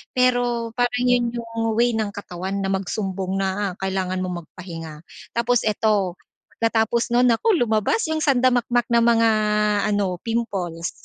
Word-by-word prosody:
pero 245 -2 +1
parang 245 0 +1
'yun 245 -1 +2
'yung 230 -1 -2
way 240 +1 +3
ng 220 -2 0
katawan 190 -1 -5
na 195 - -1
magsumbong 190 0 -2
na 195 0 -1
kailangan 185 -1 -1
mong 175 -3 -5
magpahinga. 165 -3 -9 0.3
Tapos 235 0 +2
ito, 205 -4 +1 0.4
pagkatapos 230 +1 +1
nun, 250 +1 +5
nako 440 - +2
lumabas 220 - +1
'yung 315 0 -1
sanda-makmak 245 -3 +2
na 235 0 +4
mga 235 -1 +4 0.7
ano, 195 -3 0
pimples. 195 -8 -2
225 Hz, 135 wpm, -22 LUFS, 190-240 Hz, 0.7 s, nun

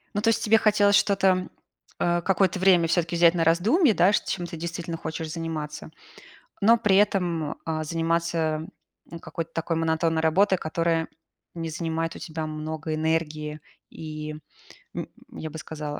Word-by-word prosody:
Ну 205 - 0
то 225 - +3
есть 225 - +1
тебе 225 +1 +5
хотелось 205 -2 +4
что-то, 190 -3 +2 0.5
а, 175 0 +1
какое-то 190 0 +1
время 180 -3 +4
всё-таки 170 0 0
взять 170 0 +6
на 165 - +1
раздумье, 215 - +4
да, 185 +2 +4
ш - - +2
чем 175 -2 -3
ты 170 - -7
действительно 170 0 -5
хочешь 160 0 -5
заниматься, 160 -2 -5 0.7
но 225 +3 +6
при 210 -4 +2
этом, 175 -6 +1
а, 160 -1 -2
заниматься, 165 -1 -1 0.4
м, 170 - -7
какой-то 165 0 -6
такой 165 0 -1
монотонной 160 0 +1
работой, 190 +4 +3
которая 165 0 -1 0.5
не 165 -1 -4
занимает 165 0 -3
у - - -8
тебя 160 -1 -5
много 155 0 -4
энергии 155 -1 -2 0.3
и, 155 -1 -7 0.6
м, - - -4 0.2
я 155 - -7
бы 160 - -7
сказала, 150 -1 -6
165 Hz, 160 wpm, -25 LUFS, 160-185 Hz, 0.7 s, взять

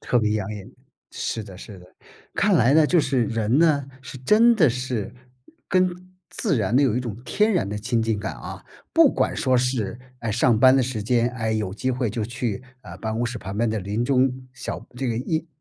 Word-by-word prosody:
特 125 - +1
别 110 -2 +1
养 105 -2 -2
眼， 100 -3 -9 0.4
是 115 - -3
的 100 -3 -11
是 100 +1 -11
的。 90 - -15 0.5
看 - - +2
来 125 +5 +4
呢， 155 -1 +6
就 175 +2 +4
是 135 -4 +1
人 115 +3 0
呢， 155 -4 +3 0.2
是 130 - -9
真 220 - +5
的 170 -10 +4
是 125 -3 -4 0.5
跟 185 0 0 0.2
自 - - -1
然 110 +1 +1
呢， 140 - +5
有 125 -5 +2
一 - - +1
种 115 -5 -5
天 215 +8 +2
然 180 - 0
的 105 +1 -4
亲 115 +2 0
近 110 -2 0
感 100 - -4
啊。 - - -9 0.3
不 - - +6
管 - - 0
说 130 -1 +2
是， 120 -4 -1 0.2
呃， 115 - -2
上 115 +1 +3
班 130 +1 +6
的 130 - +3
时 120 -4 -3
间， 120 +2 +2
哎， 110 -3 -2
有 105 -4 -2
机 130 +5 -1
会 125 -2 -1
就 110 +1 -3
去， 115 0 -3 0.2
呃， - - -10
办 110 0 -3
公 115 +2 -1
室 120 0 -5
旁 95 -1 -7
边 115 +2 +1
的 110 0 -1
林 105 +4 -2
中 130 0 +1
小 130 - -6
这 130 0 -2
个 115 - -1
荫 155 +7 -2
120 Hz, 240 characters per minute, -23 LUFS, 110-130 Hz, 0.5 s, 呢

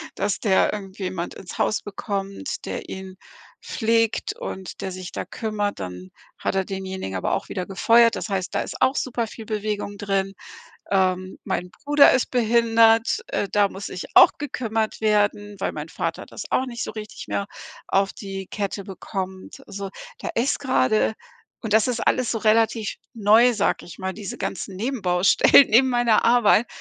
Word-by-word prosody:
dass 200 -1 -1
der 195 -4 +3
irgendjemand 190 -3 -5
ins 180 - -9
Haus 215 - +1
bekommt, 200 +4 -5
der - - -5
ihn 190 0 -8 0.5
pflegt 225 -1 0
und 190 -1 -7
der 190 - -3
sich 185 0 -7
da - - -4
kümmert, 210 -2 -3
dann 90 0 -7 0.3
hat - - -2
er 190 - +2
denjenigen 190 - -5
aber 95 - -1
auch - - -2
wieder 185 -2 -3
gefeuert. 230 +4 +4
Das - - -5
heißt, 195 -2 -2
da - - +2
ist - - -7
auch 260 - +3
super 240 -4 -1
viel 220 0 -10
Bewegung 210 -1 -3
drin. 195 -1 -1 0.6
Ähm, 185 -1 +1
mein 180 +1 -3
Bruder 290 +4 +5
ist 255 - +1
behindert, 230 - +4
äh, 200 - -1
da 205 -1 +3
muss 195 +1 -7
sich 180 - -6
auch - - +9
gekümmert 225 -6 -2
werden, 205 -1 +1
weil - - -2
mein - - -6
Vater - - -4
das - - -8
auch 260 - +1
nicht 240 -2 -4
so - - -5
richtig 215 -1 -8
mehr 200 - -2 0.4
auf 195 0 +2
die 195 -2 -7
Kette 200 -1 -4
bekommt. 190 -1 -6
So, 200 -1 -6 0.3
da - - -5
ist 245 +4 +1
gerade 255 -5 +2 0.5
und 220 - -3
das 220 +2 +4
ist 240 -2 -1
alles 255 -2 +2
so - - -1
relativ 220 0 +2 0.2
neu, 225 +3 +5
sage 210 - 0
ich 175 - -11
mal, 190 0 -3
diese 200 -1 -7
ganzen 190 0 -4
Nebenbaustellen 200 +1 +4
neben 250 +5 +6
meiner 240 -3 +3
Arbeit. 235 -1 +5
205 Hz, 170 wpm, -23 LUFS, 190-230 Hz, 0.6 s, auch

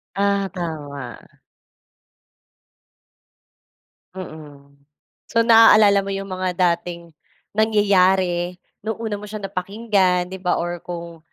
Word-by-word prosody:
Ah, 200 0 +1
tama. 145 -7 -6 3.0
Mm. 145 -6 -11 0.5
So, 230 - +2
naaalala 220 -3 +7
mo 200 - -4
'yong 195 0 -5
mga 185 -1 -2
dating 170 -1 -1 0.4
nangyayari, 190 -4 +2 0.3
no'ng 220 0 -2
una 215 -3 -3
mo 210 - -9
siyang 210 0 -7
napakinggan, 190 -2 0
'di 190 - -7
ba 180 -1 0
or 175 0 -3
kung 170 -1 -8
185 Hz, 100 wpm, -21 LUFS, 170-200 Hz, 3.0 s, naaalala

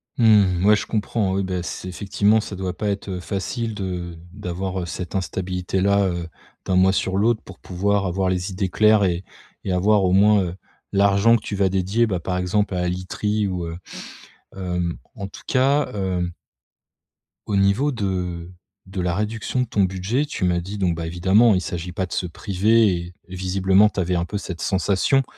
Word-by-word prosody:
Mmh, 100 -6 +4
ouais 105 +1 +7
je - - -3
comprends, 105 -2 -1
oui, 100 - 0
bah, 95 -1 -2
c'est 90 +1 -6
effectivement, 100 +3 +2
ça 105 - -7
doit 95 -1 -4
pas 105 - -3
être, 100 0 -3
heu, 90 -1 -3
facile 105 +6 -3
de 90 -4 -4 0.2
d'avoir, 95 -1 -4
heu, - - -4
cette 90 0 -6
instabilité 90 0 -2
là, 100 +1 +3
heu, 85 -2 -3 0.4
d'un 95 - 0
mois 95 +1 +5
sur 95 0 0
l'autre 110 +2 +2
pour 95 - -13
pouvoir 100 +2 0
avoir 95 +1 0
les 90 +1 -1
idées 95 0 -2
claires 105 +2 +4
et 90 -1 0 0.4
et 95 - -2
avoir 100 +3 +3
au 90 - +2
moins, 105 +1 +5
heu, 85 0 -4 0.4
l'argent 100 +3 +4
que 115 - -1
tu 105 - -5
vas 95 -1 +2
dédier, 95 +5 +1
bah, 95 -4 -1
par 90 +2 -2
exemple 100 +3 0
à 90 - -1
la 90 - 0
literie 105 +4 -1
ou, 90 -2 -3
heu, 85 0 -6 0.8
hem, 90 -2 -2 0.2
en 100 - -5
tout - - -12
cas, 140 +3 +3
hem 90 -3 -2 1.1
au 105 - -1
niveau 100 +9 +3
de 90 -6 -3 0.4
de 95 0 -4
la 90 -1 0
réduction 110 +4 -2
de - - +1
ton 105 -4 +1
budget, 95 +8 0
tu 145 -10 -3
m'as 90 -1 +1
dit, 100 +4 -6
donc 90 -4 +1
bah, 85 0 -4
évidemment 95 +7 +4
il - - +2
s'agit 90 0 -5
pas 95 +2 -2
de 90 - -8
se - - -1
priver 105 +5 +2
et 85 +1 -6 0.2
et 95 - -7
visiblement, 95 +2 +3
tu 100 - -5
avais 90 0 0
un 85 - +1
peu 105 +3 -4
cette 90 -4 -6
sensation, 100 +8 +2
95 Hz, 200 wpm, -22 LUFS, 90-105 Hz, 1.1 s, ouais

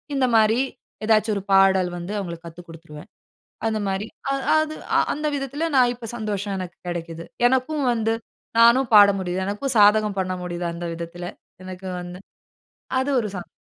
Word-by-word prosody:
இந்த 265 -2 +2
மாரி 220 +2 +4 0.5
ஏதாச்சு 220 0 +3
ஒரு 200 - -3
பாடல் 190 -1 +5
வந்து 175 +4 -6
அவங்களுக்கு 170 -3 -7
கத்துக் 170 +1 -12
குடுத்துருவேன். 155 -2 -12 0.6
அந்த 220 -1 0
மாரி 195 +2 -2 0.2
அ - - +2 0.3
அது 310 0 -2 0.4
அந்த 300 +1 -3
விதத்தில 280 +4 -3
நான் 250 -2 +5
இப்போ 240 -1 -9
சந்தோஷம் 205 -3 -3
எனக்கு 180 -2 -7
கிடைக்கிது. 170 -1 -5 0.2
எனக்கும் 260 +3 0
வந்து 225 -1 0 0.4
நானும் 235 +2 +5
பாட 205 -1 +9
முடியுது. 185 0 -2
எனக்கும் 240 +6 -1
சாதகம் 210 0 +5
பண்ண 185 0 -2
முடியுது. 175 0 -4
அந்த 170 +1 -6
விதத்தில 170 +1 -7 0.4
எனக்கு 185 0 -8
வந்து 180 +1 -8 0.8
அது 265 +2 -1
ஒரு 215 - -2
சந். 175 - -7
200 Hz, 160 wpm, -23 LUFS, 175-230 Hz, 0.8 s, பாட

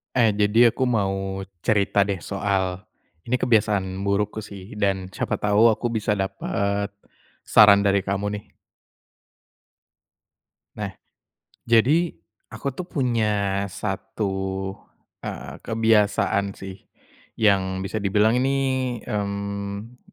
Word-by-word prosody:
Eh, 115 -3 +4
jadi 105 +3 +4
aku 130 - -2
mau 95 -4 -1 0.2
cerita 100 0 +2
deh 100 -2 -2
soal, 95 -2 -1 0.4
ini 125 - +2
kebiasaan 105 -6 +2 0.2
burukku 105 +2 0
sih 100 -1 -10
dan 95 -2 0
siapa - - -2
tahu 105 +2 +4
aku 120 - -2
bisa 110 -2 0
dapat, 100 +1 -2 0.5
saran 100 -1 +7
dari 100 0 +3
kamu 100 +1 -2
nih. - - -21 2.3
Nah, 100 -2 -4 0.8
jadi 140 +9 +3 0.4
aku 110 +5 -4
tuh 175 +7 -7
punya 105 - 0
1, 95 0 -3 0.5
eee, 70 +2 -6
kebiasaan 105 -3 +2
sih, 95 -1 -8 0.6
yang 95 -3 +2
bisa 95 +3 -3
dibilang 105 +3 +2
ini, 135 +2 +1 0.5
mmm, 100 +1 -4
100 Hz, 105 wpm, -24 LUFS, 95-110 Hz, 2.3 s, saran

